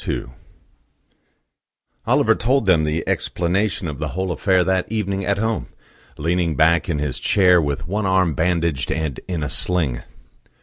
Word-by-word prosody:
II - - -1 1.8
Oliver - - +4
told 130 +1 +1
them 85 -5 +3
the 75 +1 -2
explanation 90 +2 -1
of 75 -3 -6
the - - -2
whole 95 -1 -1
affair 90 +2 +2
that 95 +2 -1
evening 100 -3 -2
at 100 0 0
home, 110 +2 -1 0.5
leaning 85 +1 0
back 80 +5 +3
in 80 - 0
his 75 -3 -3
chair, 90 -3 +4
with 70 -1 -3
one 100 +2 -1
arm 95 -3 +2
bandaged 85 -3 0
and 80 -4 -2
in 85 -5 -3
a - - -1
sling. 80 -10 0
90 Hz, 150 wpm, -21 LUFS, 80-95 Hz, 1.8 s, Oliver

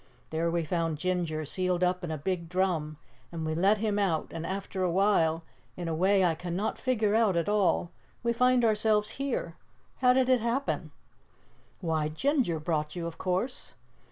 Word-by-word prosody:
There 165 +1 0
we 170 0 0
found 165 -1 -1
Ginger 165 -2 -1
sealed 180 +3 0
up 180 0 +1
in 175 - -3
a 160 - -2
big 170 +2 -3
drum 170 -5 0 0.3
and 165 -2 -4
we 155 - -1
let 195 +6 +3
him 210 -1 0
out, 175 -6 0
and 165 0 -5
after 190 0 -4
awhile, 175 -3 +2 0.3
in 175 -1 -4
a 165 - -1
way 190 +3 +3
I 170 - +3
cannot 180 +5 -3
figure 225 -5 +1
out 220 -4 +3
at 170 - 0
all, 205 -4 +2 0.3
we 235 0 +1
find 250 0 +3
ourselves 210 -1 +2
here. 235 -11 -2 0.4
How 250 -1 +4
did 255 0 +3
it 255 -2 +3
happen?" 240 +5 -1 0.9
"Why, 160 -3 0
Ginger 240 - 0
brought 155 -1 -2
you, 170 -1 -4
of 170 -1 -6
course." 190 +8 -2
180 Hz, 175 wpm, -29 LUFS, 165-210 Hz, 0.9 s, How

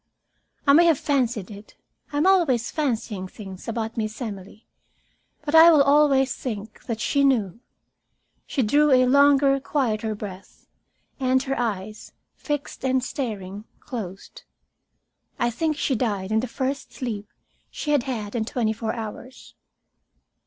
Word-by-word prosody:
I 280 - +6
may 340 +4 +7
have 330 -4 +4
fancied 240 -10 -1
it 205 +1 -12 0.4
I 290 - -3
am 300 - +2
always 325 -12 +3
fancying 225 -9 -2
things 190 -2 -10
about 225 0 -3
Miss 215 -1 -3
Emily 205 -3 -7 0.8
but 295 - -3
I 325 +1 +9
will 300 -3 +6
always 275 -2 +4
think 215 -3 -7
that 230 -2 -3
she 280 +4 +1
knew. 230 -7 +1 0.9
She 270 - 0
drew 290 +7 +3
a 255 -2 +5
longer, 280 +1 +5
quieter 225 -6 -1
breath, 195 -2 -10 0.5
and 260 0 +2
her 270 0 -2
eyes, 215 -3 -4 0.2
fixed 290 -3 -5
and 260 -1 +1
staring, 210 -6 -5
closed. 205 -8 -8 1.0
I 240 0 +1
think 310 +4 -1
she 270 - 0
died 205 -4 -2
in 220 - +3
the 250 - -2
first 265 +2 -3
sleep 215 -5 -5 0.4
she 295 - -4
had 290 -3 +4
had 225 -5 -4
in 235 -3 0
twenty 220 -1 -1
four 220 0 -3
hours. 235 +3 -8
245 Hz, 145 wpm, -24 LUFS, 215-280 Hz, 1.0 s, I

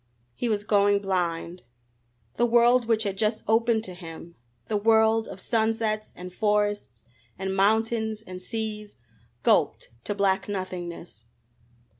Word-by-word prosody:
He 240 - -2
was 205 -2 0
going 205 -1 +3
blind. 180 -3 -2 0.8
The 240 - +3
world 240 +1 +4
which 225 -1 +2
had 195 -2 -3
just 215 0 0
opened 225 0 +2
to 185 - -6
him 170 -1 -10 0.3
the 215 - -1
world 220 +1 +3
of 190 - -9
sunsets 220 0 0
and 180 0 -9
forests 205 - -1 0.3
and 190 0 -3
mountains 220 +2 +1
and 185 -3 -9
seas 215 +1 -4 0.5
gulped - - +2
to 205 - -2
black 195 0 +1
nothingness! 175 - -6
205 Hz, 130 wpm, -26 LUFS, 185-220 Hz, 0.8 s, world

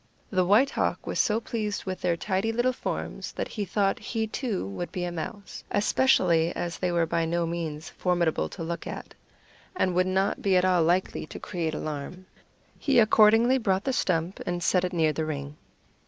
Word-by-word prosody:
The 185 -2 +3
White 240 +8 +5
Hawk - - -1
was - - -3
so 215 +1 +3
pleased 220 -3 -3
with 185 -1 -4
their 175 -2 +1
tidy 195 +4 -1
little 240 +3 +1
forms - - -5
that - - -4
he 210 -2 -3
thought 195 +1 0
he, 225 -2 -2
too, 220 - -3
would 100 - -5
be 180 - -3
a 175 - -2
mouse, 200 +5 -7
especially 185 -7 +3
as 170 -1 -4
they 180 -1 0
were 170 -1 +2
by 165 0 0
no 170 +1 0
means 165 -2 -4
formidable 175 -3 0
to 170 - -7
look 170 +1 -4
at, - - -7 0.6
and 185 - +1
would 185 +1 +2
not 190 +1 0
be 195 -2 +3
at 180 - +3
all 180 -2 +3
likely 175 -1 0
to - - -8
create 165 -3 -3
alarm. 155 +6 -5 0.5
He 275 -4 +2
accordingly 225 +3 +5
brought 195 -4 +1
the 265 - -1
stump 175 -5 0
and 175 -1 -3
set 180 +1 +3
it 180 - -1
near 160 -3 +2
the 160 - -2
ring. 145 -1 -5
185 Hz, 195 wpm, -27 LUFS, 170-210 Hz, 0.6 s, White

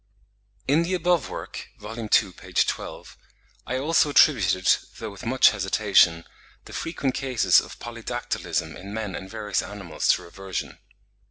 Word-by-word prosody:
In 145 +5 +4
the 180 +2 0
above 175 -2 +1
work - - -7
(vol. 105 +2 -8
ii. 110 -2 -5 0.2
p. 90 +1 -14
12), - - -2 0.5
I 130 - -1
also 150 +2 +2
attributed, 95 - +4 0.3
though 110 -2 -6
with 100 +4 -9
much 130 +2 +5
hesitation, 95 -4 +3 0.4
the - - -12
frequent 140 -5 -2
cases 130 -3 +3
of - - -11
polydactylism 120 +1 -4
in 100 +2 -8
men 110 -4 -4
and 95 - -7
various 105 -3 -2
animals 95 -6 -5
to - - -4
reversion. 95 +1 -6
110 Hz, 145 wpm, -25 LUFS, 95-135 Hz, 0.5 s, much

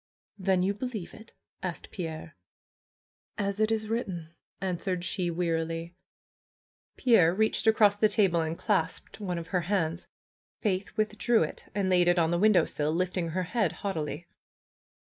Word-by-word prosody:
"Then 190 -1 +2
you 195 +2 +1
believe 215 -4 -5
it?" 220 +1 -14 0.3
asked 180 -3 -5
Pierre. 160 -2 -6 1.0
"As 200 0 -2
it 215 0 +3
is 220 -1 0
written," 185 -8 -3 0.3
answered 180 -1 -2
she 180 -1 -1
wearily. 165 0 -2 1.0
Pierre 185 -10 +5
reached 220 +2 +1
across 210 -2 +5
the 215 +1 +4
table 185 -6 +3
and 160 +1 -2
clasped 210 0 -1
one 180 -4 -3
of 170 0 -6
her 180 -2 +1
hands. 170 -2 -1 0.5
Faith 200 0 -2
withdrew 215 +2 +2
it - - -7
and 200 -2 +1
laid 180 -1 +4
it 175 +1 +4
on 165 -1 +3
the 175 - +1
win 215 +2 +5
dowsill, 150 -4 +1
lifting 180 +1 -1
her 185 +3 -1
head 205 -1 0
haughtily. 170 -3 -4
185 Hz, 150 wpm, -29 LUFS, 170-210 Hz, 1.0 s, Pierre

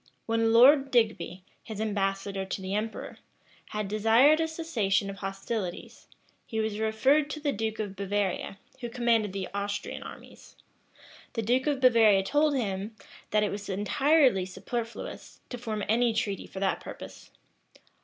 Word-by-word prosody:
When 225 0 +1
Lord 270 +4 +7
Digby, 215 -7 0 0.2
his 220 -2 -8
ambassador 195 -2 -1
to 190 - -4
the 190 0 -4
emperor, 215 +2 -4 0.5
had 210 -1 -3
desired 225 +9 +4
a 325 - +1
cessation 230 - -1
of 195 - -10
hostilities, 195 0 -5 0.4
he 220 - -3
was 220 -1 -2
referred 265 +7 +2
to 305 - -5
the 290 -1 0
duke 220 -1 -3
of 205 -2 -4
Bavaria, 195 0 -2 0.2
who 240 -2 -5
commanded 230 -4 +1
the 190 -1 -4
Austrian 200 0 -3
armies. - - -12 0.8
The 225 - -2
duke 250 +5 +1
of 285 -3 0
Bavaria 225 -6 +5
told 295 +7 +2
him, 205 -3 -3 0.3
that 210 0 +2
it 210 - 0
was 205 0 -6
entirely 245 - +3
superfluous 230 +5 -6
to 245 - -6
form 220 -3 -3
any 230 +1 +2
treaty 210 -4 -2
for 190 - -8
that 195 0 0
purpose. - - -10
220 Hz, 150 wpm, -28 LUFS, 200-245 Hz, 0.8 s, Lord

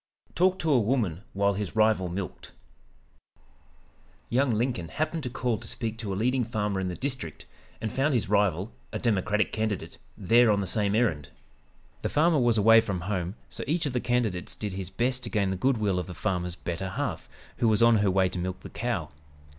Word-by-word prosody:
'" - - -32
TALKED 185 +1 +2
TO 160 -1 +1
A 135 - +5
WOMAN 105 -7 0
WHILE 100 +1 +2
HIS 100 0 -4
RIVAL 110 -4 +3
MILKED 90 +1 -6 1.8
Young 130 +2 +3
Lincoln 115 -7 -1
happened 155 - -2
to 125 - -4
call 120 -3 -1
to - - -10
speak 115 -2 -4
to 105 -4 -4
a - - -1
leading 125 +5 +1
farmer 105 -4 -1
in 95 - -1
the 90 - -3
district, 130 - -5 0.3
and 110 -1 -3
found 135 +1 +1
his 115 - 0
rival, 100 0 +1 0.2
a - - -2
Democratic 105 -2 +1
candidate, 110 -3 -3 0.2
there 115 +5 +5
on 105 -1 +3
the 100 - -1
same 100 +2 +1
errand. 85 - +1 0.7
The - - -1
farmer 160 +1 +3
was 120 -3 +3
away 115 +2 +7
from 100 -5 -3
home, 90 0 -2
so 90 - -5
each 160 +3 0
of 140 - -2
the 125 - +1
candidates 115 -8 -1
did 105 -3 -4
his 95 -1 -5
best 125 +6 0
to - - -4
gain 100 -3 +1
the - - -1
good 130 +7 +1
will 100 -4 +1
of 90 - -4
the 90 - -8
farmer's 90 -2 -2
"better 90 +2 -4
half," 90 - -3 0.3
who 120 - +2
was 110 +1 +4
on 115 -1 +6
her 100 -1 +2
way 95 0 +3
to 90 - -4
milk 90 +1 -4
the - - -10
cow. 100 -10 -2
105 Hz, 210 wpm, -27 LUFS, 95-120 Hz, 1.8 s, away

